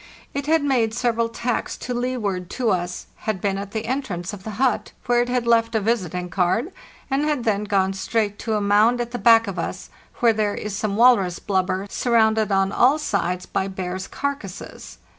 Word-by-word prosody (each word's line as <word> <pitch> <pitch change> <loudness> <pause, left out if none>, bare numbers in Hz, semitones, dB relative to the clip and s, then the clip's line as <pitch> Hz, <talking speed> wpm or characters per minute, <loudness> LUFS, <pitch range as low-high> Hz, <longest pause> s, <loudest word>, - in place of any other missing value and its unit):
It 280 0 -3
had 320 -1 +3
made 240 -6 +1
several 235 -1 +1
tacks 235 +1 -2
to 250 - -4
leeward 225 -8 -2
to 245 -3 +2
us, 180 -1 -2 0.2
had 215 -3 0
been 195 0 -1
at 200 0 -6
the 220 +1 -4
entrance 215 -9 -3
of 195 -2 -9
the 220 - -6
hut, 260 0 0
where 240 0 +3
it 245 - -1
had 250 -1 0
left 230 -1 +3
a - - +4
visiting 185 -5 -1
card, 185 - 0 0.4
and 275 +2 +1
had 300 -5 0
then 210 -3 0
gone 195 -2 +1
straight 205 +1 -1
to 220 -2 -1
a 210 - 0
mound 210 +4 +4
at 240 0 -3
the 245 - -4
back 230 -1 +6
of 195 -3 -4
us, - - -5 0.2
where 235 -2 +3
there 210 -1 0
is 210 -2 -4
some 205 -1 -2
walrus 215 -7 +4
blubber, 190 -1 -1
surrounded 220 -2 +2
on 195 0 +2
all 260 +8 +4
sides 180 - -1
by 190 - -2
bears' 185 0 -4
carcasses. 275 -10 -6
220 Hz, 200 wpm, -22 LUFS, 195-240 Hz, 0.4 s, back